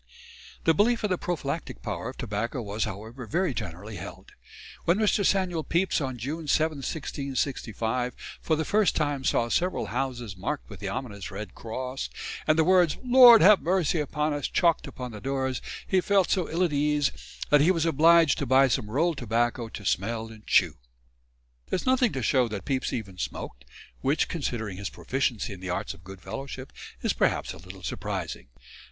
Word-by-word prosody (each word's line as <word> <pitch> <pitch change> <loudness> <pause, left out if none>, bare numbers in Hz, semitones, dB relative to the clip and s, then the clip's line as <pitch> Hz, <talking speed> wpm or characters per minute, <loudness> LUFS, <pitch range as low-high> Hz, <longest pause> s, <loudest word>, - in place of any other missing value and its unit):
The 165 - +4
belief 230 +8 +2
in 210 - 0
the 185 - +2
prophylactic 165 -3 -4
power - - -3
of - - -10
tobacco 115 +6 -3
was, 105 -1 -2
however, 110 +4 -7
very 175 +1 0
generally 100 0 -6
held. 85 - -9 0.5
When 170 +3 +3
Mr. 210 -1 +2
Samuel 185 -5 +1
Pepys 170 +1 +1
on 130 -3 -3
June 150 +7 -5
7, 155 +1 +2
1665, 130 -4 -2 0.3
for 160 - +1
the 160 0 -2
first 210 +1 +2
time 145 -3 0
saw 120 - +2
several 180 +9 0
houses 120 -5 -3
marked 130 +11 -4
with 100 - -9
the 100 - -4
ominous 105 -4 -5
red 100 -1 -7
cross, 130 +4 -5 0.4
and 155 - +4
the 160 - +5
words 180 -2 +4
"Lord, 245 -4 +9
have 205 +2 +7
mercy 175 -2 +1
upon 150 +1 -1
us" 145 -2 -2
chalked 170 -3 +2
upon 125 -3 -7
the 105 -2 -9
doors, 130 -1 -1 0.2
he 190 -1 +2
felt 195 -1 +2
so 185 -4 +1
ill 170 +3 +1
at 170 -4 +1
ease 145 0 +2 0.4
that 145 -1 +6
he 160 - +4
was 165 -3 +2
obliged 165 -1 +5
to 140 - -2
buy 135 +2 +6
some 105 -3 -1
roll 160 +9 +2
tobacco 120 -2 -1
to 105 - -9
smell 110 +5 -1
and 110 -1 -14
chew. 85 -5 +3 0.9
There - - +1
is - - -6
nothing 255 -3 +3
to 130 - -3
show 125 +2 +3
that 105 -3 -6
Pepys 135 -2 -1
even 100 -6 -5
smoked, 65 -5 -5 0.4
which 140 +4 +1
considering 110 - -3
his 100 -1 -4
proficiency 125 -5 -2
in 95 - -10
the 95 0 -6
arts 95 +4 -2
of 85 - -17
good 95 0 -11
fellowship, 135 +2 -7 0.3
is - - +2
perhaps - - 0
a - - -11
little 90 +3 -12
surprising. - - -4
135 Hz, 185 wpm, -27 LUFS, 110-165 Hz, 0.9 s, Lord